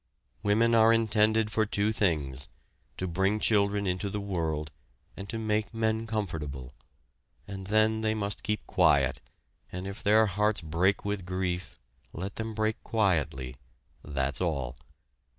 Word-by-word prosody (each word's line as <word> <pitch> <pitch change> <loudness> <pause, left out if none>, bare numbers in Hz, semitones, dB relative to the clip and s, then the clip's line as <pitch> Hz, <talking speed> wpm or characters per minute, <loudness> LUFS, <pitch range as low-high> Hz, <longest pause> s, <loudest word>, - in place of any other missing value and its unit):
Women 110 +3 +3
are 115 0 +6
intended 110 -1 +3
for 110 +1 +2
two 105 +1 +1
things, 70 - 0 0.5
to 95 - -2
bring 95 +5 +1
children 100 -2 +3
into 90 +2 -1
the 105 - -3
world 80 -6 -2 0.4
and 100 0 -8
to 115 - -3
make 110 0 -1
men 110 0 0
comfortable, 75 - -4 0.7
and 95 -2 -7
then 110 +1 +3
they 110 0 +1
must 100 -1 -2
keep 105 -1 -2
quiet 70 -1 +3 0.5
and 90 +1 -5
if 100 +2 -6
their 110 +2 +5
hearts 105 +1 +1
break 85 +6 +1
with 100 -2 -2
grief, 90 0 -3 0.4
let 95 +4 -6
them 110 -1 -4
break 110 0 -1
quietly 75 - 0 0.5
that's 70 -1 -2
all. 70 -8 -1
100 Hz, 140 wpm, -29 LUFS, 80-110 Hz, 0.7 s, are